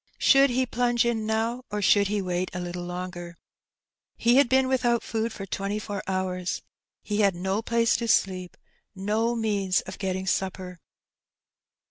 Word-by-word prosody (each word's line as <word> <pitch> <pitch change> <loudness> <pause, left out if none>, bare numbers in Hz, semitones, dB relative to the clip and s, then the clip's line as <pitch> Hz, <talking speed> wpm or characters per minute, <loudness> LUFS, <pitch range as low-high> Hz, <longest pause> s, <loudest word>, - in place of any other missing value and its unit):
Should 275 0 +5
he 255 +1 +1
plunge 240 -1 +1
in 225 -2 -1
now, 225 +3 -1
or 210 0 -3
should 200 0 +4
he 205 0 -1
wait 180 0 -2
a - - -2
little 175 0 -5
longer? 175 -1 -6 0.8
He 240 +2 +4
had 280 -3 +5
been 260 0 +3
without 245 -3 +1
food 225 +1 -2
for 195 - -7
twenty 195 +2 -3
four 205 -2 -4
hours. 185 -1 -2 0.4
He 210 0 -2
had 200 -3 +3
no 190 +4 -1
place 230 0 +2
to 235 - -3
sleep, 185 -4 +1 0.4
no 215 +5 0
means 205 -4 +1
of - - -9
getting 190 -1 -2
supper. 185 -1 -2
205 Hz, 160 wpm, -26 LUFS, 185-235 Hz, 0.8 s, Should